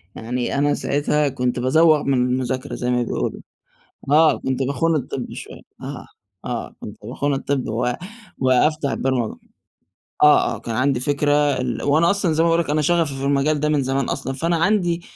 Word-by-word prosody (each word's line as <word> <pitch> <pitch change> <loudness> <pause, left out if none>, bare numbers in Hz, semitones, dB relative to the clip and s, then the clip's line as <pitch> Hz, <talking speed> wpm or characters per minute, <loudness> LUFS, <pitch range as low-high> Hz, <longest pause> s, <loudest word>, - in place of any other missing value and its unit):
يعني 120 +3 -3
أنا 145 +1 +2
ساعتها 145 +1 0
كُنت 125 -2 -2
بازوغ 155 +4 +4
من 140 - +1
المذاكرة 125 0 -1
زي 125 0 -2
ما 125 0 +1
بيقولوا، - - -3 0.7
آه، 155 +1 +5
كُنت 130 0 -2
باخون 160 +5 0
الطِب 130 -2 -4
شويّة، - - -9 0.2
آه، - - -7 0.4
آه - - -5
كُنت 105 - -9
باخون 140 +5 -2
الطِب 135 -1 -2
و 120 +3 0 0.5
وأفتح 140 +3 +2
البرمجة، 130 -5 -1 0.9
آه، 150 0 +5
آه، - - -9
كان 115 - -5
عندي 130 +1 +1
فكرة 145 +2 0
ال 135 -5 0
وأنا 155 +4 +3
أصلًا 195 -5 0
زي 160 +1 +2
ما 170 - +3
باقول 165 +1 +3
لك 145 - -10
أنا 150 +1 +1
شغفي 165 -2 +1
في 135 - -6
المجال 140 +2 +1
ده 150 +1 0
من 145 -2 +1
زمان 135 0 -1
أصلًا 135 -1 -3
فأنا 165 +5 0
عندي، 175 -1 +1
140 Hz, 180 wpm, -21 LUFS, 130-155 Hz, 0.9 s, آه